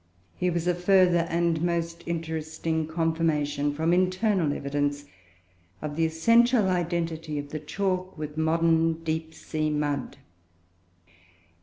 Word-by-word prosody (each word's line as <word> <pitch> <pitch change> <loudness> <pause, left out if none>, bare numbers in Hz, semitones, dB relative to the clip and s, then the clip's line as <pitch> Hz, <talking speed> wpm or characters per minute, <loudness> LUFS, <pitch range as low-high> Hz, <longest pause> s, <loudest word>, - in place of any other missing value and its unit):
Here 180 0 0
was 170 -1 -2
a 180 - +3
further 180 -1 +3
and 170 -1 +1
most 170 -1 -1
interesting 160 -1 -2
confirmation, 160 -3 0
from 160 +3 +1
internal 185 -2 +2
evidence, 145 0 -2 0.7
of 150 -1 -5
the 165 0 +2
essential 230 +7 +4
identity 165 -3 -2
of 145 0 -5
the 155 - -4
chalk 185 +4 -2
with 150 -1 -6
modern 165 0 +2
deep 160 0 -2
sea 155 -1 -2
mud. 145 -3 -2
165 Hz, 120 wpm, -26 LUFS, 155-175 Hz, 0.7 s, essential